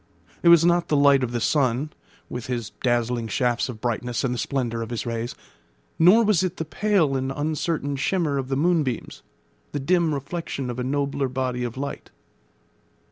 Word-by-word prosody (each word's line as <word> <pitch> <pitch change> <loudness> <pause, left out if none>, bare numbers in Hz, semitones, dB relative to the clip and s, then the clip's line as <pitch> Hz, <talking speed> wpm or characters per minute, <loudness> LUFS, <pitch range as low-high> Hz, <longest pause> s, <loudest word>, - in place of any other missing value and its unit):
It - - +1
was 170 -1 +7
not 175 0 +3
the 150 - +2
light 140 -1 +5
of 120 - -2
the 120 - -1
sun, 135 +2 +1 0.4
with 125 -2 -6
his 120 -3 -3
dazzling 120 -1 0
shafts 120 +3 0
of 115 -3 -7
brightness 120 +1 -2
and 130 -2 0
the 120 - -3
splendour 120 -4 -2
of 115 - -5
his 120 -2 -4
rays; 115 0 -3 0.6
nor 185 +8 +7
was 210 -6 +3
it 185 -1 -2
the 160 - -3
pale 175 -4 +1
and 130 0 -1
uncertain 150 0 -2
shimmer 150 0 0
of 130 - -4
the 135 0 -1
moonbeams, 150 -6 0 0.5
the 145 - -1
dim 165 +1 +2
reflection 140 -2 -4
of 120 - -6
a - - -1
nobler 140 +1 -1
body 130 -1 -2
of 120 0 -4
light. 140 +1 -5
135 Hz, 185 wpm, -24 LUFS, 125-160 Hz, 0.6 s, was